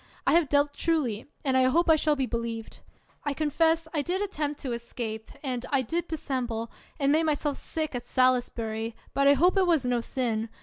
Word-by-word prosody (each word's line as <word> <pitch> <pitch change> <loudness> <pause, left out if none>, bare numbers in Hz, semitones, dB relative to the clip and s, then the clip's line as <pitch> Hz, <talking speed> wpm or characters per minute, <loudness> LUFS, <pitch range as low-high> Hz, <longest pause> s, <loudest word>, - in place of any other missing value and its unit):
I - - +4
have 335 -4 +4
dealt 285 0 +3
truly, 280 -12 0 0.2
and 265 -1 +2
I 260 0 +5
hope 335 +7 +3
I 320 - +7
shall 305 -1 +2
be 270 -2 0
believed. 230 -2 -4 0.4
I 290 -1 -2
confess 320 +2 +2
I 300 - +1
did 355 +6 -1
attempt 305 -8 -2
to 265 - -3
escape, 230 -2 -5
and 255 -3 -2
I 275 -3 +2
did 340 +8 -2
dissemble, 245 -7 -3 0.3
and 280 -1 +3
made 320 +2 +3
myself 295 -1 0
sick 310 -2 -3
at 245 -1 -5
Salis 255 -1 +3
bury, 225 0 -4 0.2
but 275 0 +3
I 280 - +8
hope 355 +8 +3
it 375 -2 +4
was 320 -7 +3
no 245 -1 +1
sin. 230 -3 -1
275 Hz, 205 wpm, -27 LUFS, 240-315 Hz, 0.4 s, I